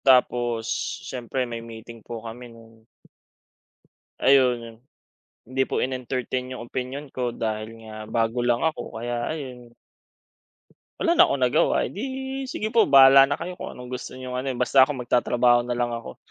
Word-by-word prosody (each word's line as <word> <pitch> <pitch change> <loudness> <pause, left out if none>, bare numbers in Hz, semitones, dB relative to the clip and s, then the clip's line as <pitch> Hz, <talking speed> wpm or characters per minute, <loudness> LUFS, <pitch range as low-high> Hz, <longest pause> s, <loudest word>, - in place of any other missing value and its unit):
Tapos 120 -3 +3 0.4
siyempre 125 +1 -3
may 115 -1 -6
meeting 115 0 -11
po 115 +1 -8
kami 120 +2 -8
nun 115 -1 -17 1.3
ayun 130 -2 +5
yun. 115 -1 -11 0.7
Hindi 130 +2 -1
po - - -1
in-entertain 130 0 -3
yung 120 - -7
opinyon 130 +3 -5
ko, 125 -1 -2
dahil 110 -1 -3 0.2
nga 110 -1 -10
bago 115 +1 0
lang 120 +2 +1
ako 160 -7 -2
kaya 120 +1 -3
ayun 125 -6 -8 1.2
wala 340 0 +2
na - - +8
akong 130 - +1
nagawa, 125 +5 +2
"Edi 265 +4 -5
sige 215 - -3
po 230 - +6
bahala 135 0 +9
na 145 - 0
kayo 180 +2 -5
kung - - -7
anong 125 0 -10
gusto 125 - -6
niyong 130 -1 -6
ano, 130 +2 -3
eh, 125 - -6
basta 130 +2 +5
ako 130 - 0
magtatrabaho 120 0 +3
na 120 0 -3
lang 120 0 0
ako, 115 - -7
125 Hz, 160 wpm, -24 LUFS, 115-135 Hz, 1.3 s, bahala